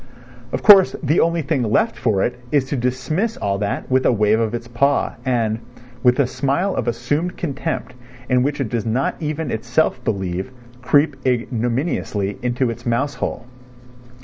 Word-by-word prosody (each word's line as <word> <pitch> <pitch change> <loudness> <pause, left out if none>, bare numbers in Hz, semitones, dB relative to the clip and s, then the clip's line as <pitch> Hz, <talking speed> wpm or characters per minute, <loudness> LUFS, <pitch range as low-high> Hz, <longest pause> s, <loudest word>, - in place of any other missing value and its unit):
Of - - -3
course 195 -3 +8
the 150 +3 +2
only 170 -1 +2
thing 145 -1 0
left 115 - +1
for 105 -5 +1
it 125 0 -2
is 145 -3 +2
to - - -1
dismiss 130 - -1
all 100 -1 -1
that 100 +5 -3
with 130 0 +3
a - - +4
wave 105 -1 +2
of 115 0 0
its 120 0 -6
paw, 140 +4 +1
and, 115 -4 0 0.4
with 125 +2 +3
a 140 - +5
smile 140 +9 -1
of - - -2
assumed 145 +9 -1
contempt 160 0 -3 0.3
in 125 0 +3
which 145 +3 -1
it 130 -5 -1
does 115 -2 -1
not 120 +5 0
even 155 -2 -3
itself 120 +7 0
believe, 95 -2 -2 0.3
creep 145 +3 +3
ignominiously 120 - -1
into 125 0 0
its 115 - -9
mouse 135 +5 0
hole. 120 - -4
125 Hz, 170 wpm, -20 LUFS, 115-145 Hz, 0.4 s, course